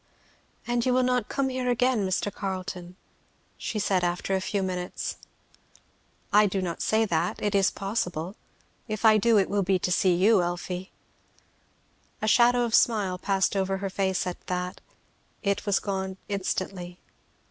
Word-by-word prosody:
"And 240 0 0
you 255 - +2
will 255 - +3
not 250 -3 +1
come 275 -1 0
here 255 -1 -2
again, 245 -4 +2
Mr. 185 +2 -1
Carleton?" 185 -2 -5 0.6
she 220 - -4
said 195 -3 +1
after 175 +2 -1
a 190 - 0
few 195 +1 -1
minutes. 180 -1 -4 1.2
"I 210 0 +6
do 195 0 -1
not 175 -3 -3
say 220 +1 +2
that 170 -3 -1
it 205 0 -1
is 195 -1 +4
possible 195 -3 -3 0.5
if 215 0 -3
I 215 -1 +7
do, 230 +1 +4
it 195 - +3
will 205 0 0
be 190 0 +2
to 180 - -2
see 180 -1 +3
you, 195 +3 +4
Elfie." 180 +1 -4 1.3
A 215 - -2
shadow 245 +2 +5
of 235 - -3
a - - +7
smile 200 -6 +2
passed 195 +1 +1
over 195 0 0
her 195 0 -4
face 190 -1 0
at 180 -1 -6
that. 180 0 -3 0.6
It 200 +1 -1
was 200 - +3
gone 190 -1 -3
instantly. 185 -2 -3
195 Hz, 165 wpm, -27 LUFS, 185-215 Hz, 1.3 s, I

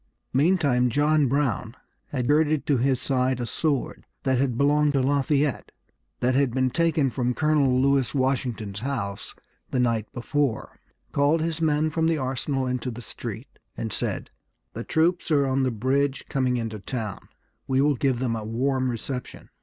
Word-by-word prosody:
Meantime 140 -4 +3
John 150 +3 +3
Brown 125 -4 -1 0.3
had 125 -4 -2
girded 150 0 +2
to 145 - +2
his 130 +1 +1
side 130 -1 0
a 120 - -2
sword 145 +2 -2 0.2
that 130 -2 +2
had 130 -3 0
belonged 145 +1 +3
to 135 - +2
Lafayette, 140 +1 +1 0.5
that 125 +1 +2
had 135 -2 +1
been 130 -1 +2
taken 160 -4 +2
from 125 -1 -1
Colonel 145 -5 +2
Lewis 135 0 +2
Washington's 125 -6 -1
house 115 -6 -4 0.3
the 130 - -1
night 115 -3 0
before, 135 0 -2 0.3
called 145 +3 +2
his 165 0 -2
men 155 0 +2
from 160 +1 +1
the 165 -1 +2
arsenal 135 0 -2
into 125 0 -2
the 120 0 -7
street, - - -8 0.2
and - - -3
said, - - -3 0.4
"The 115 - -5
troops 170 +6 +1
are 145 -3 +3
on 135 0 +1
the 130 - +2
bridge, 130 +4 0
coming 130 -2 0
into 110 -2 -4
town; 110 -1 -5 0.4
we 130 0 +1
will 145 +1 +4
give 130 0 +1
them 120 -2 -1
a 110 - -4
warm 130 +4 0
reception." 125 +2 -6
135 Hz, 165 wpm, -25 LUFS, 125-145 Hz, 0.5 s, will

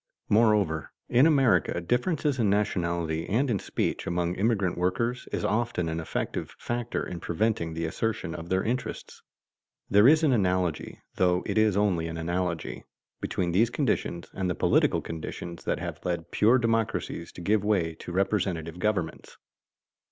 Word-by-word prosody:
Moreover, 105 -8 +3 0.2
in 125 +5 +5
America 130 - +3
differences 130 - 0
in 110 -4 +3
nationality 85 -5 0
and 125 +6 +1
in 105 - +1
speech - - -2
among 85 0 0
immigrant 100 -2 +1
workers 115 +8 -1
is - - -2
often 110 -6 0
an 80 0 -2
effective 80 - -4
factor 120 0 -3
in 90 - -6
preventing 85 -2 -1
the 80 0 -2
assertion 95 0 -2
of 85 +1 -7
their 95 0 +1
interests. 125 +3 -4 0.7
There 105 +4 +7
is 155 +3 +6
an 150 - +4
analogy 90 -6 0 0.2
(though 90 -1 +2
it - - -2
is 110 -3 +3
only 95 -6 +1
an 80 0 -5
analogy) 85 0 -2 0.4
between 85 -1 -1
these 110 +7 +3
conditions 105 - -1
and 95 -1 -2
the 90 - -1
political - - +3
conditions 85 +1 -7
that - - 0
have - - -6
led 85 -1 -3
pure 115 +5 +4
democracies 115 -7 -1
to - - -9
give 105 +3 +2
way 95 -6 +1
to - - -7
representative 90 -3 -1
governments. 95 -5 -2
95 Hz, 155 wpm, -27 LUFS, 85-115 Hz, 0.7 s, There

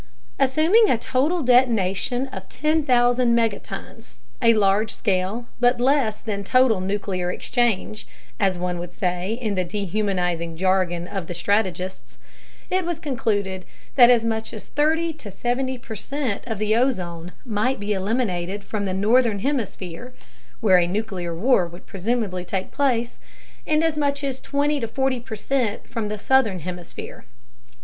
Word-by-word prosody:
Assuming 320 - +4
a - - +3
total 285 +9 0
detonation 245 -1 +2
of 190 -6 -8
10,000 250 -6 +2
megatons 225 -3 -3 0.3
a 230 -2 +5
large 205 +1 +3
scale 195 +3 -1
but 245 0 +3
less 250 -4 +2
than 200 -3 -3
total 245 -2 +3
nuclear 185 -2 -2
"exchange," 225 -3 -1 0.3
as 195 -3 +2
one 180 0 -2
would 175 0 -6
say 180 +2 -2
in 225 -3 -2
the 185 -2 0
dehumanizing 180 -3 -2
jargon 180 -2 +1
of 190 -4 -5
the 175 - -5
strategists 185 0 -1 0.5
it 370 0 +2
was 345 -1 -2
concluded 205 - -2 0.3
that 245 -3 +8
as 235 -2 +4
much 220 -1 -2
as 215 - -9
30 320 +2 +1
70 245 +5 -2
percent 240 0 -4
of 225 -3 -2
the 215 +1 +1
ozone 180 -9 -1
might 235 +3 0
be 205 +1 -1
eliminated 195 -2 -1
from 205 0 -3
the 185 -1 -2
northern 220 +2 +3
hemisphere 225 - -3 0.5
(where 190 -5 +6
a 170 - +2
nuclear 185 -3 -3
war 195 -1 +3
would 175 +2 -13
presumably 195 -2 -2
take 190 +1 -3
place) 240 -4 0 0.5
and 310 +1 +3
as 325 -2 +1
much 285 -1 0
as 270 -2 -2
20 290 0 0
40 260 +2 0
percent 230 0 -2
from 225 -3 -3
the 210 0 -3
southern 225 -3 +2
hemisphere. 175 0 -8
220 Hz, 140 wpm, -23 LUFS, 190-255 Hz, 0.5 s, that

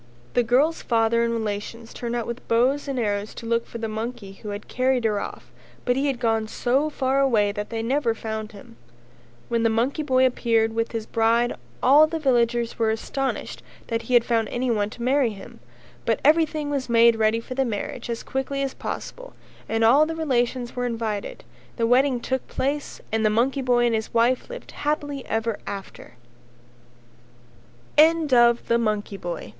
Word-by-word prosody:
The 245 - +4
girl's 265 +8 +2
father 230 0 +2
and 235 - 0
relations 225 +1 -4
turned 240 0 -4
out 235 -2 -2
with 235 +1 -7
bows 255 +6 +2
and 275 -2 -3
arrows 205 -2 -2
to 230 - -8
look 230 0 0
for - - -7
the 225 -1 -3
monkey 220 -1 -5
who 200 +2 -9
had 205 +1 -6
carried 255 -1 +1
her 210 -2 +1
off - - -8 0.3
but 245 - +2
he 275 +2 0
had 265 -4 -1
gone 225 -2 +1
so 265 +7 0
far 270 -2 0
away 225 -7 +3
that 210 0 -5
they 225 -1 -3
never 245 -1 +1
found 220 -1 -5
him. 200 - -14 0.7
When 235 -1 0
the 230 - +3
monkey 240 +7 0
boy 260 -3 +3
appeared 230 -3 +1
with 230 0 -1
his 225 -2 -4
bride 230 +2 +2 0.3
all 290 +4 +7
the 325 - -3
villagers 240 -5 +1
were 225 -1 +2
astonished 265 +5 -3 0.3
that 230 -1 -1
he 250 - 0
had 235 - +5
found 225 -3 +1
anyone 235 -4 0
to 235 - -8
marry 260 -2 +2
him, 195 -1 -12 0.4
but 225 - +1
everything 305 -1 +3
was 275 -3 -2
made 230 0 +5
ready 220 +1 +2
for 245 +3 -7
the 270 +1 +1
marriage 235 +1 -4
as 230 -1 -3
quickly 275 +1 -2
as 270 - -3
possible - - -7 0.3
and 225 0 +1
all 275 +7 +6
the 325 - -4
relations 250 -5 -1
were 245 0 -1
invited 225 -3 -4
and 120 +1 -28
the 230 - +1
wedding 250 +2 +3
took 260 +1 -3
place 285 +2 -3
and 220 0 0
the 215 - +4
monkey 255 +6 +1
boy 245 -1 +3
and 235 - +2
his 220 -1 -2
wife 240 - +2
lived - - -9
happily 290 -2 -2
ever 225 -1 -1
after. 195 -1 -8
235 Hz, 180 wpm, -24 LUFS, 225-265 Hz, 0.7 s, all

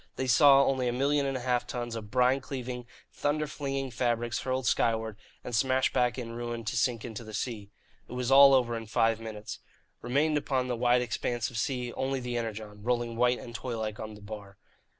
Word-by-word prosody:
They 130 - -2
saw 135 +2 +7
only 130 -2 +1
a - - +1
million 140 +2 +1
and 135 -1 -1
a - - -6
half 125 -1 0
tons 120 -2 -4
of 110 -2 -6
brine 125 +3 +3
cleaving, 125 -2 -6 0.3
thunder 150 +1 0
flinging 135 -3 -3
fabrics 120 -1 0
hurled 130 0 -2
skyward 110 -3 +1 0.3
and 125 - -6
smashed 130 +2 +2
back 125 0 +2
in 115 -2 -5
ruin 120 -1 -5
to 110 - -2
sink 120 -2 0
into 115 -1 -6
the 110 -1 -8
sea. 105 -5 -4 0.4
It - - -8
was 125 0 -2
all 135 0 +9
over 120 -3 +2
in 115 -1 -6
five 115 0 +2
minutes. 110 -2 -7 0.4
Remained 145 +5 +1
upon 130 -3 -1
the 125 - -1
wide 120 +1 +3
expanse 120 0 -2
of 115 - -3
sea 125 -1 -2
only 135 0 -1
the 125 -1 -4
Energon, 110 -3 -5
rolling 120 0 -1
white 125 +1 +3
and 120 - -9
toylike 110 -3 -4
on 110 0 -6
the 105 - -14
bar. 100 -1 -9
120 Hz, 205 wpm, -29 LUFS, 115-130 Hz, 0.4 s, all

